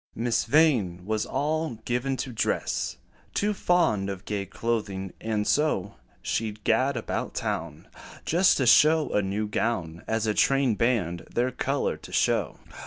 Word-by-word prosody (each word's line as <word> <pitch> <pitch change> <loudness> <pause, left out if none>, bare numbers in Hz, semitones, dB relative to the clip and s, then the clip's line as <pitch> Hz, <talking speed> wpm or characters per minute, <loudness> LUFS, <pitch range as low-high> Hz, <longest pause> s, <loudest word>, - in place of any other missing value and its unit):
Miss 120 0 0
Vain 115 - +2
was 110 +1 -1
all 155 0 -1
given 125 +2 -1
to 130 - -8
dress 110 - -1 0.4
Too 210 +1 +1
fond 165 - +1
of 95 -2 -6
gay 100 -2 -3
clothing; 100 -3 -3
and 110 -2 -1
so, 125 -11 +1 0.3
She 110 -1 -1
'd 105 0 -20
gad 130 +4 +2
about 115 - -4
town 80 -2 -4 0.4
Just 180 +3 +4
to 130 - +1
show 155 +5 +5
a 105 - +3
new 100 +2 -2
gown, 95 -6 -2
As 110 0 0
a 105 - +1
train 135 +1 +3
band 100 -7 0
their 125 +2 0
color - - -1
to - - -13
show. - - +1
115 Hz, 155 wpm, -26 LUFS, 100-135 Hz, 0.4 s, show